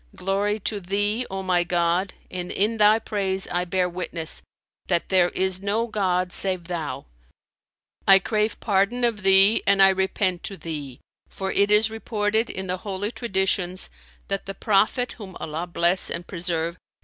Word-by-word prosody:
Glory 200 +3 -1
to 205 +1 -2
Thee, 205 +5 -1
O 195 0 -4
my 180 -2 +2
God, 175 +2 0 0.2
and 180 -1 -5
in 215 +3 0
Thy 210 0 +5
praise 195 -3 -2
I 180 0 -1
bear 180 0 0
witness, 170 -2 -2 0.5
that 175 -2 0
there 185 -2 +4
is 190 0 -1
no 205 +3 0
god 185 -5 -1
save 185 -2 0
Thou! 160 -6 -5 1.0
I 195 - +9
crave 215 +2 -1
pardon 205 +5 +1
of 230 -3 +2
Thee 195 +3 +6
and 200 0 +4
I 195 0 +8
repent 190 -1 0
to 195 - -5
Thee! 145 -7 -6 0.3
For 190 0 -4
it 200 0 +2
is 215 +1 +4
reported, 220 0 -1
in 190 - -5
the 185 0 -2
Holy 200 +2 -4
Traditions, 190 -5 -1 0.4
that 195 0 -3
the 195 - -5
Prophet 215 +5 +1
(whom 190 -4 -9
Allah 160 +3 -4
bless 175 +1 +2
and 170 +1 -5
preserve!) 170 -2 -3
190 Hz, 160 wpm, -24 LUFS, 180-205 Hz, 1.0 s, I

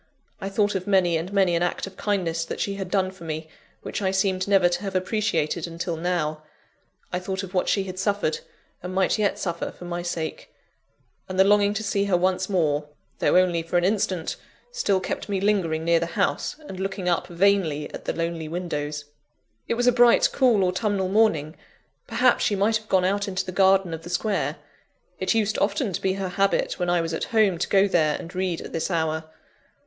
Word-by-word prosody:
I 195 - -4
thought 205 +1 +1
of 190 0 -3
many 185 -4 +3
and 165 +4 -3
many 190 -3 +3
an 170 - 0
act 175 - -1
of 195 -1 -11
kindness 175 -6 -1
that - - -6
she 200 - -1
had 195 -2 -5
done 185 -1 +1
for 190 -2 -14
me, 155 0 -5 0.4
which - - -4
I 190 - +1
seemed 190 0 0
never 195 -3 +5
to 175 +1 -1
have 195 -2 -5
appreciated 180 -5 0
until 170 +1 -4
now 160 -2 -1 0.7
I 180 - 0
thought 190 +1 -4
of 190 0 -8
what 180 - +1
she 195 - +2
had 185 -1 -7
suffered, 200 -5 0 0.4
and 180 +1 -6
might 190 +3 +2
yet 205 -1 +1
suffer, 170 -2 -3
for 180 - -11
my 175 0 -3
sake 170 -3 -4 0.8
and 185 0 -3
the - - +9
longing 205 +1 +3
to 220 - -2
see 200 -1 0
her 190 -3 +2
once 185 +1 0
more, 150 -6 +1 0.3
though - - +3
only 180 -2 +3
for 165 +2 -1
an 175 - +2
instant, 185 -3 0 0.3
still 205 - +1
kept 185 - -4
me 195 -1 0
lingering 185 -6 +1
near 170 0 +4
the 170 - -2
house - - 0
and 185 - -7
looking 195 -1 -3
up 175 - +1
vainly 175 -5 +1
at - - -8
the - - -1
lonely 165 -1 -3
windows. 150 -3 -4 0.6
It - - 0
was 245 +1 0
a 250 - +6
bright, 240 -1 +5
cool, 240 -7 +4
autumnal 190 +1 0
morning; 185 -7 +2 0.5
perhaps - - +3
she 205 - +2
might 210 +3 +2
have 215 -1 -15
gone 185 -1 +3
out 200 +2 0
into 185 -1 -2
the 185 - -5
garden 190 -1 +3
of 160 - -5
the 175 - -10
square: 200 +3 -1 0.6
it - - +1
used 215 -1 +1
often 200 +1 0
to - - -3
be 190 - +1
her 190 -1 -3
habit, 195 +2 0
when 180 -1 0
I 175 -1 +3
was 165 0 -3
at 160 - -2
home, 210 -6 +2
to - - -1
go 195 0 +4
there 155 -5 +2
and 165 - -9
read 185 -2 -2
at - - -9
this 165 - -1
hour. 160 -2 -1
185 Hz, 215 wpm, -24 LUFS, 170-200 Hz, 0.8 s, the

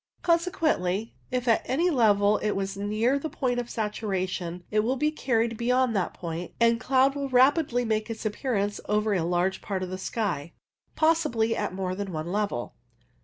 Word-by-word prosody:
Consequently, 315 - +1 0.2
if 250 -1 -2
at 230 - +4
any 335 +8 +1
level 210 -5 +4
it 210 - -1
was 195 0 -2
near 215 +5 0
its 280 +2 -1
point 250 -5 -1
of 240 -1 -4
saturation, 185 -5 -3
it 215 - +2
will 235 +5 +1
be 300 +3 +1
carried 230 -6 0
beyond 250 0 +2
that 190 -3 0
point, 170 0 -5
and 230 0 +4
cloud 265 +2 +3
will 280 -1 -3
rapidly 260 -1 +3
make 220 0 -1
its 225 0 -6
appearance 210 -2 -1
over 210 0 +2
a 185 - +1
large 175 +3 0
part 190 -2 -3
of 185 - -5
the 185 - -4
sky, 180 -7 -3 0.4
possibly 240 -9 +2
at 205 -3 -3
more 185 -1 -2
than 200 0 -4
one 160 +1 -4
level. 200 -12 -2
220 Hz, 175 wpm, -27 LUFS, 195-250 Hz, 0.4 s, at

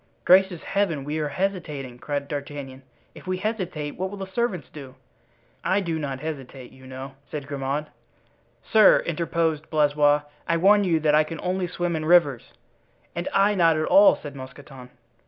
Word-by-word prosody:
"Gracious 185 -2 +4
Heaven, 185 -8 -1
we 150 +3 -3
are 150 - -1
hesitating!" 145 -7 -4
cried 140 +2 -3
D'Artagnan; 140 -2 -6 0.3
"if - - -14
we 185 0 -1
hesitate 185 -8 -3
what 190 +1 -2
will 205 - -8
the 195 - -5
servants 200 - -1
do?" 135 -4 -11 0.7
"I 190 - +2
do 170 -4 -2
not 135 -3 -4
hesitate, 135 -5 -7
you 130 0 -15
know," 130 +1 -8 0.2
said 145 -2 -5
Grimaud. 140 +1 -3 0.8
"Sir," 220 -1 +5
interposed 165 -2 -1
Blaisois, 145 -1 +3 0.2
"I 170 - +2
warn 205 +4 +5
you 165 -3 +2
that 150 -1 +2
I 155 +1 +5
can 160 0 -7
only 185 0 -1
swim 175 -1 -2
in 155 -1 -3
rivers." 155 -7 +3 0.6
"And 170 +1 -3
I 200 +1 +3
not 165 -5 +3
at 155 - 0
all," 295 0 +6
said 145 -2 -10
Mousqueton. 130 -1 -11
155 Hz, 170 wpm, -24 LUFS, 140-180 Hz, 0.8 s, all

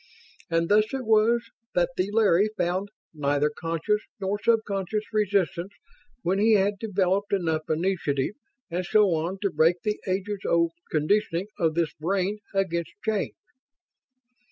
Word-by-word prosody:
And 165 0 +1
thus 210 +2 +3
it 260 -2 -4
was 225 +2 +4 0.3
that 175 0 +2
the 185 +2 0
Larry 210 -2 +4
found 185 +3 -1 0.2
neither 145 0 +1
conscious 165 +7 -1 0.2
nor 200 +1 -1
subconscious 215 -2 0
resistance 195 -3 0 0.5
when 190 +3 +1
he 220 +2 +5
had 200 0 +2
developed 200 -2 0
enough 160 -5 0
initiative 160 -3 0 0.4
and 180 +2 -1
so 200 0 +4
on 165 +4 -2
to 200 - +1
break 160 +3 +4
the 210 -1 -1
ages 195 +2 -1
old 170 -1 +2 0.2
conditioning 170 +4 +1
of 160 -3 +1
this 165 -3 0
brain 190 +6 -1
against 170 -4 -1
change." 215 -2 -1
190 Hz, 135 wpm, -26 LUFS, 170-210 Hz, 0.5 s, he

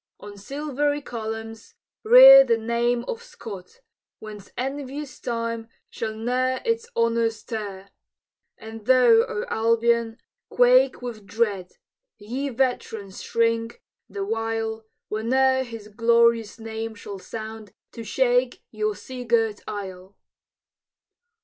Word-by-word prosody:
On 205 0 -10
silvery 290 +6 -2
columns, 225 -1 -7 0.3
rear - - +10
The 230 - +1
name 235 +1 0
of 475 -1 -4
Scott, 225 - -11 0.4
whence 210 -2 -11
envious 275 +2 -5
Time 230 -1 -3 0.2
Shall 220 -1 -4
ne'er 255 +3 -1
its 460 0 -1
honors 230 -1 0
tear! 200 -3 -6 0.7
And 220 -1 -11
thou, 245 -3 +6
O 210 - -4
Albion, 230 0 +1 0.3
quake - - +4
with 220 -5 -7
dread! 205 -4 -1 0.4
Ye 250 +7 -4
veterans 230 -6 -2
shrink, 230 0 -1 0.3
the 195 0 -4
while, 225 0 -3 0.2
Whene'er 260 +5 +2
his 230 -4 -8
glorious 230 0 +2
name 225 0 -6
shall 200 -2 -8
sound 220 0 -8 0.2
To 230 - -8
shake 245 +2 +1
your 215 -1 -2
sea 255 +2 -8
girt 225 -3 +1
isle! 190 -1 -7
230 Hz, 110 wpm, -24 LUFS, 220-255 Hz, 0.7 s, rear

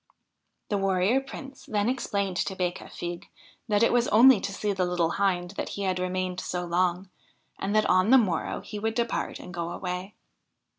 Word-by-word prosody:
The 205 - 0
Warrior 195 +6 +2
Prince 270 0 -10
then 210 -1 0
explained 200 -7 -1
to 190 - -1
Becafigue 175 -1 -4 0.4
that 210 0 +3
it 230 - +4
was 245 0 +3
only 245 +2 +7
to - - -3
see 205 +1 -1
the 190 -1 0
little 175 -2 +1
Hind 180 -3 0
that 200 - -4
he 200 - -2
had 185 -1 0
remained 185 0 -2
so 180 -1 -3
long, 180 +2 0 0.5
and 200 +2 -1
that 215 - +4
on 185 +3 +3
the 265 - +8
morrow 185 -9 0
he 210 - -7
would 220 +1 -1
depart 235 -1 -1
and 180 - -10
go 170 -1 -3
away. 180 +2 -5
195 Hz, 185 wpm, -27 LUFS, 180-215 Hz, 0.5 s, the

